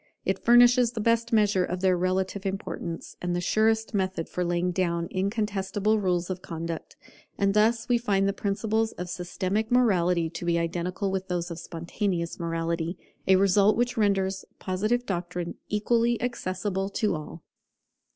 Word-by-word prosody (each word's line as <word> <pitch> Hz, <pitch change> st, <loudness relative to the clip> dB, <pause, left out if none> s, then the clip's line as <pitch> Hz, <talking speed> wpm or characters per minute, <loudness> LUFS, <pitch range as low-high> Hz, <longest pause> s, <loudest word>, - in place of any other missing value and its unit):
It -, -, -1 dB
furnishes 240 Hz, 0 st, +6 dB
the 225 Hz, -, -4 dB
best 230 Hz, +2 st, +1 dB
measure 205 Hz, -4 st, +3 dB
of 180 Hz, 0 st, -3 dB
their 190 Hz, -1 st, +4 dB
relative 185 Hz, +2 st, -1 dB
importance, 190 Hz, -4 st, -5 dB
and 175 Hz, 0 st, -1 dB
the -, -, 0 dB
surest 220 Hz, +4 st, +1 dB
method 185 Hz, -4 st, -1 dB
for 180 Hz, -, -2 dB
laying 175 Hz, +1 st, 0 dB
down 170 Hz, -2 st, 0 dB
incontestable 205 Hz, +1 st, 0 dB
rules 180 Hz, -2 st, 0 dB
of 185 Hz, 0 st, -5 dB
conduct. 165 Hz, -1 st, -6 dB, 0.4 s
And 200 Hz, 0 st, +2 dB
thus 225 Hz, +2 st, +2 dB
we 245 Hz, -1 st, +3 dB
find 195 Hz, -4 st, +1 dB
the 200 Hz, -, +1 dB
principles 220 Hz, +3 st, -1 dB
of 180 Hz, 0 st, -6 dB
systematic 190 Hz, +5 st, -2 dB
morality 180 Hz, -9 st, +3 dB
to 165 Hz, +1 st, -7 dB
be 170 Hz, -1 st, +1 dB
identical 175 Hz, +3 st, -2 dB
with 190 Hz, 0 st, -2 dB
those 175 Hz, -1 st, -2 dB
of 165 Hz, -, -6 dB
spontaneous 170 Hz, +1 st, -3 dB
morality, 165 Hz, +1 st, -2 dB, 0.3 s
a 190 Hz, -, +6 dB
result 200 Hz, +2 st, +4 dB
which 245 Hz, +1 st, +1 dB
renders 195 Hz, -3 st, +1 dB
Positive 215 Hz, +6 st, -1 dB
doctrine 175 Hz, -3 st, -3 dB, 0.2 s
equally 230 Hz, +3 st, +1 dB
accessible 195 Hz, -4 st, -2 dB
to 210 Hz, 0 st, 0 dB
all. 155 Hz, +1 st, -7 dB
190 Hz, 155 wpm, -27 LUFS, 175-215 Hz, 0.4 s, furnishes